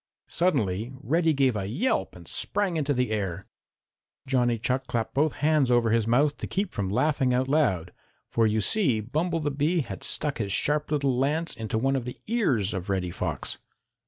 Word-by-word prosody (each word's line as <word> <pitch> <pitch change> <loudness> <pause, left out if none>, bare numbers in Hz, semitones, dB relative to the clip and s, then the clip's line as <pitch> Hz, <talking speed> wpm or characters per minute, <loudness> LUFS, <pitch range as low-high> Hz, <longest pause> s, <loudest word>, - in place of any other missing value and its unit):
Suddenly 115 - +1
Reddy 160 +4 +2
gave 135 -5 +2
a 100 -2 -2
yelp 150 - -1
and - - -13
sprang 200 -4 -1
into 150 -2 0
the 125 -4 0
air. 95 -3 -2 0.8
Johnny 125 -3 +2
Chuck 125 +3 -1
clapped 115 -2 -2
both 150 +2 +2
hands 150 -2 +2
over 120 -2 +3
his 115 -1 +2
mouth 140 +5 +3
to - - -5
keep 195 0 -2
from 100 -2 -2
laughing 130 +3 +2
out 130 +1 +1
loud, 95 - +1 0.3
for 115 -1 +2
you 110 0 +1
see 135 - +1
Bumble 160 - -1
the 145 -1 -1
Bee 155 +5 +1
had 100 -8 -7
stuck 150 -4 0
his 100 -3 -2
sharp 150 +8 +1
little 140 -3 +1
lance 150 +6 0
into 110 0 -3
one 135 +4 +1
of 130 -3 -2
the 125 - -6
ears 140 - +1
of 95 0 -4
Reddy 90 -3 -1
Fox. - - -3
130 Hz, 190 wpm, -26 LUFS, 110-150 Hz, 0.8 s, over